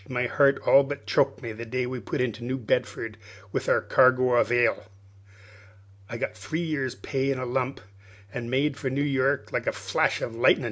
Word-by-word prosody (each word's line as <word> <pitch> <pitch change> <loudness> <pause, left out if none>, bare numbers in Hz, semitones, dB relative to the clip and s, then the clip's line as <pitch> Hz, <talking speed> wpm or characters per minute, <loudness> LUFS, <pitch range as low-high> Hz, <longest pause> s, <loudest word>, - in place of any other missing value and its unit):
My 125 -1 -1
heart 140 +2 +3
all 140 - +7
but 140 +1 -5
choked 135 -1 +1
me 115 - -4
the 110 +2 -7
day 125 +2 -2
we 125 0 -4
put 110 - -3
into 120 -2 -2
New 130 +2 -2
Bedford 110 -2 -2 0.3
with - - -2
our - - +3
cargo 130 0 +4
of 120 - +3
ile. 120 -3 +2 1.3
I 115 - -5
got - - -2
my - - -23
three 110 - -4
years' 140 -6 -2
pay 135 -1 -2
in 135 - 0
a 130 - -3
lump, 130 +2 -2 0.5
an' 120 -1 -5
made 140 +3 +1
for 135 - -2
New 140 +2 -1
York 140 0 0
like - - -2
a - - +3
flash - - 0
of 115 - -4
lightnin'. 115 - +4
130 Hz, 205 wpm, -26 LUFS, 120-135 Hz, 1.3 s, all